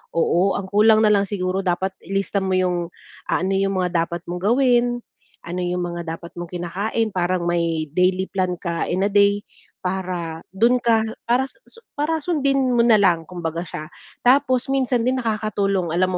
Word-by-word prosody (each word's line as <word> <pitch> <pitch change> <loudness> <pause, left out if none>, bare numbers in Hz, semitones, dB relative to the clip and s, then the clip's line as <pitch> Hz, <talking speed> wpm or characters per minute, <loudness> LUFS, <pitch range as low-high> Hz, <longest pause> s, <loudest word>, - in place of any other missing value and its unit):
oo, 175 +3 +2
ang 200 - -3
kulang 215 +1 +5
na 210 - +5
lang 200 -1 +3
siguro 185 -1 -2
dapat 185 +1 -1
ilista 195 +1 -1
mo 190 -1 0
yung 180 -2 0 0.4
ah, - - +1
ano 195 - 0
yung 195 0 +1
mga 175 -2 0
dapat 170 0 -6
mong 175 +1 -4
gawin, 240 +2 +3 0.5
ano 175 +2 -4
yung 180 0 -1
mga 170 -1 -4
dapat 170 - -11
mong 175 -1 -6
kinakain, 195 +6 -2
parang 180 -1 0
may 170 -2 0
daily 185 +1 +2
plan 185 -2 0
ka 170 -2 -3
in 185 +2 0
a 200 - +1
day, 205 0 +3 0.4
para 180 -3 -3 0.2
dun 240 +5 +4
ka, 225 -2 +3 0.2
para 245 +3 +3
susu 460 - -13 0.2
para 320 +2 +1
sundin 275 -6 +1
mo 235 - +4
na 235 -2 +5
lang 170 -5 +2
kumbaga 170 -2 -4
siya. 155 +1 -7 0.3
Tapos 255 0 +3
minsan 255 -3 +1
din 255 +1 +1
nakakatulong 200 -5 -1
alam 185 +1 +2
190 Hz, 180 wpm, -22 LUFS, 175-230 Hz, 0.5 s, kulang